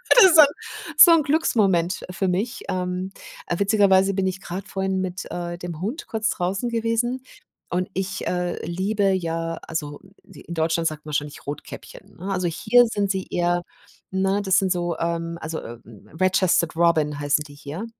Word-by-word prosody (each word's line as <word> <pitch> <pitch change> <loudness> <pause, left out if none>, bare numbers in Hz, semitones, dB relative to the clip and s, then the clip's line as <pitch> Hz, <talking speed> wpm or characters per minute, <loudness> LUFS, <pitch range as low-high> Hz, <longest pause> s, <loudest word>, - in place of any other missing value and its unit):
Das 380 -9 +8
so 315 - +11
'n 295 - +8 0.5
so 345 - +10
'n, 330 -2 +5
Glücksmoment 205 - +1
für 190 +1 -1
mich. 195 +7 -2
Ähm, 180 +1 -2 0.4
äh, 175 - -1
witzigerweise 195 -1 +4
bin 190 -1 0
ich 190 0 -4
grad 190 +3 -6
vorhin 190 -1 -1
mit, 185 0 -4
äh, 175 0 -4
dem 175 -2 -7
Hund 230 - -4
kurz 220 -1 -1
draußen 190 +6 -1
gewesen 235 +2 -1 0.5
und 180 +1 -1
ich, 190 0 -3
äh, 180 -1 -2
liebe 195 +3 0
ja, 165 -2 -2
also 150 -3 -4 0.2
d 195 -1 -15
in 170 - -8
Deutschland 165 0 +1
sagt 155 -1 -5
man - - -8
wahrscheinlich 145 0 -4
Rotkäppchen, 145 0 -9
ne? 190 +3 -5
Also 185 -2 0
hier 225 +9 +4
sind 205 -3 -1
sie 190 -1 -1
eherm 175 0 +1 0.5
ne? 195 +1 +1
Das 190 -1 +3
sind 190 -1 0
so, 175 -1 -1
ähm, 170 0 -2
also, 160 0 -4
„Red-Chested-Robin“, 160 - 0
heißen 145 +1 +1
die 145 - -14
hier. 145 +8 -7
185 Hz, 170 wpm, -23 LUFS, 170-195 Hz, 0.5 s, so